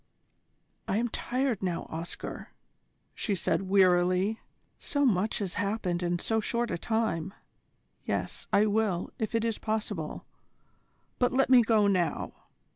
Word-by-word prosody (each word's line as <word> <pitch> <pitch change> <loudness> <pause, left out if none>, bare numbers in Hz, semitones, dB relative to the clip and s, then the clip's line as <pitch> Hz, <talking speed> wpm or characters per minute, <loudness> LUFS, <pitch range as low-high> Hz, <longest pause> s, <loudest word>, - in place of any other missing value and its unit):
"I 195 - +1
am 240 +2 0
tired 255 -1 -1
now, 180 -3 -1
Oscar," 165 +2 -6 0.6
she 205 - -1
said 180 +1 -1
wearily, 185 +2 +3 0.4
"so 285 -4 0
much 210 -3 +2
has 190 -3 -3
happened 200 -4 -1
in 175 0 0
so 225 +5 0
short 235 +2 -1
a 170 - -1
time. 220 -5 -1 0.7
Yes, - - -3
I 210 - +5
will, 205 -4 0
if 220 +1 -2
it 225 0 +1
is 225 -2 -1
possible: 210 -7 -3 0.9
but 245 0 +3
let 265 +1 +2
me 250 -2 +9
go 220 -2 +3
now. 185 -4 0
205 Hz, 135 wpm, -29 LUFS, 180-225 Hz, 0.9 s, me